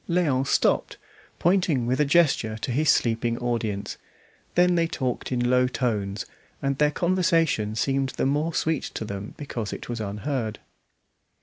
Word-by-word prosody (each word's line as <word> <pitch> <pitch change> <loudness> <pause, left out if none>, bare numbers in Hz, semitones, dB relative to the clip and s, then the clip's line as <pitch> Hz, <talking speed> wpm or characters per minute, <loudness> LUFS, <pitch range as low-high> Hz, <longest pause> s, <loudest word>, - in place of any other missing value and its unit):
Léon 145 -7 +1
stopped, - - +1 0.4
pointing 175 -8 +2
with 125 +3 0
a 150 - +4
gesture 140 -8 +2
to 120 - -3
his 150 +5 +1
sleeping 115 0 +2
audience; 115 -4 -2 0.6
then 180 0 +4
they 170 -1 +2
talked 130 -6 -3
in 120 -1 +1
low 125 0 +4
tones, 105 -6 -2 0.3
and 140 0 -1
their 150 0 +4
conversation 165 - +1
seemed 135 +3 0
the - - +1
more 150 +4 +1
sweet 160 -2 0
to 110 - -3
them 100 0 -6
because 120 -8 -5
it - - -7
was 120 -2 -3
unheard. 110 +2 -3
130 Hz, 150 wpm, -25 LUFS, 115-155 Hz, 0.6 s, a